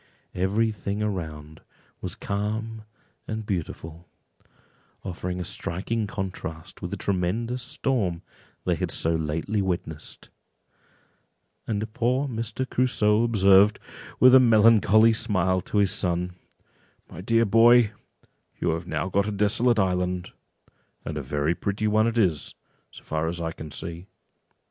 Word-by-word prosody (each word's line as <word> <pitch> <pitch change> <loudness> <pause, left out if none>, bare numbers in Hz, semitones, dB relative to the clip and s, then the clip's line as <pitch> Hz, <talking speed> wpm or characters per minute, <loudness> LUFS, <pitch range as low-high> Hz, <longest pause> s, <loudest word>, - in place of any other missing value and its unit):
Every 105 +5 +1
thing 105 0 -4
around 80 -6 -5 0.4
was - - -4
calm 110 +2 -4 0.4
and 110 0 -4
beautiful, 85 -3 -5 0.9
offering 90 -1 -4
a - - -2
striking 100 +4 -3
contrast 90 -6 -6
with - - -4
the - - -4
tremendous 105 +7 -1
storm 115 -9 -1 0.4
they - - +2
had - - -2
so 80 - +1
lately 80 +6 -1
witnessed; 85 -5 -5 1.4
and 110 0 -3
poor 125 +5 +1
Mr. 115 +1 -3
Crusoe 110 -5 +2
observed, 105 -2 +5 0.4
with 130 0 +7
a 130 - +10
melancholy 110 -2 +5
smile, 95 -5 +1
to 105 - -4
his 100 -2 +3
son—"My 90 0 -6
dear 115 +4 +2
boy, 115 +1 +6 0.7
you - - 0
have 85 +2 -4
now - - -2
got 100 +2 +1
a - - -1
desolate 110 +4 +2
island, 90 -2 0 0.7
and 80 - -4
a 75 - -3
very 75 +4 -1
pretty 100 +4 -2
one 110 +1 +3
it 115 0 -2
is, 90 -9 0 0.3
so - - -14
far 80 +1 -2
as 85 +1 -3
I 80 -1 -2
can 80 -1 -9
see." 85 +5 -7
100 Hz, 130 wpm, -25 LUFS, 90-110 Hz, 1.4 s, a